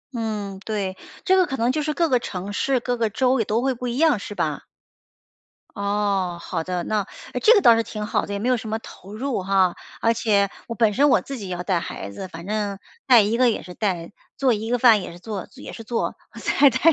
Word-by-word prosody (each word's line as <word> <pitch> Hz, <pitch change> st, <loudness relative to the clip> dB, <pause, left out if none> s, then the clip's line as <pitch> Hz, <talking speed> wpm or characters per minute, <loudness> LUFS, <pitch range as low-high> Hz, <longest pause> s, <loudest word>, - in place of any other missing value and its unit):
嗯， 210 Hz, -4 st, -3 dB
对， 200 Hz, -4 st, -3 dB, 0.3 s
这 375 Hz, -, +5 dB
个 370 Hz, -1 st, +4 dB
可 270 Hz, -, -3 dB
能 235 Hz, +2 st, +2 dB
就 305 Hz, -, -1 dB
是 305 Hz, 0 st, -1 dB
各 335 Hz, -1 st, +2 dB
个 250 Hz, -4 st, +3 dB
城 195 Hz, -2 st, -5 dB
市、 265 Hz, +4 st, +1 dB
各 245 Hz, 0 st, -2 dB
个 225 Hz, -2 st, +1 dB
州 255 Hz, +3 st, +2 dB
也 225 Hz, -, +1 dB
都 225 Hz, +3 st, 0 dB
会 265 Hz, -1 st, +1 dB
不 250 Hz, +1 st, -5 dB
一 240 Hz, +2 st, -3 dB
样 305 Hz, -8 st, +4 dB
是 205 Hz, -, -7 dB
吧？ -, -, -2 dB, 1.1 s
哦， 200 Hz, -3 st, 0 dB
好 165 Hz, -1 st, -3 dB
的， 180 Hz, 0 st, -3 dB
那 215 Hz, -1 st, 0 dB, 0.3 s
诶， -, -, -1 dB
这 465 Hz, +2 st, +6 dB
个 405 Hz, -, +5 dB
倒 235 Hz, -, +7 dB
是 230 Hz, -, +2 dB
挺 215 Hz, -2 st, -5 dB
好 -, -, 0 dB
的， 205 Hz, -, -4 dB
也 -, -, -1 dB
没 235 Hz, -, -2 dB
有 255 Hz, -, +4 dB
什 220 Hz, -2 st, -6 dB
么 220 Hz, -, -1 dB
投 200 Hz, -1 st, -12 dB
入 250 Hz, -3 st, -2 dB
哈， 190 Hz, -2 st, +2 dB, 0.3 s
而 230 Hz, -, +3 dB
且 205 Hz, -3 st, +2 dB, 0.2 s
我 230 Hz, -, -5 dB
本 220 Hz, -2 st, +3 dB
身 285 Hz, +4 st, +4 dB
我 -, -, +5 dB
自 275 Hz, -, -7 dB
己 195 Hz, -3 st, -6 dB
也 180 Hz, -, -2 dB
要 180 Hz, -, -5 dB
带 180 Hz, -2 st, +1 dB
孩 100 Hz, -, -6 dB
子， 190 Hz, -, -7 dB
反 170 Hz, -1 st, -10 dB
正 205 Hz, -1 st, -2 dB, 0.3 s
带 245 Hz, -4 st, +8 dB
一 215 Hz, +3 st, +1 dB
个 250 Hz, -1 st, +5 dB
也 -, -, -2 dB
是 180 Hz, -, -10 dB
带， 180 Hz, -4 st, -2 dB, 0.3 s
做 265 Hz, -3 st, +3 dB
一 220 Hz, +1 st, -3 dB
个 245 Hz, -, +2 dB
饭 230 Hz, -4 st, +6 dB
也 180 Hz, -, -7 dB
是 170 Hz, -, -11 dB
做 200 Hz, -2 st, -6 dB
也 -, -, -9 dB
是 225 Hz, -, -8 dB
做， 230 Hz, +1 st, -2 dB, 0.2 s
再 280 Hz, -1 st, +4 dB
带 260 Hz, +1 st, -2 dB
215 Hz, 270 characters per minute, -23 LUFS, 195-245 Hz, 1.1 s, 带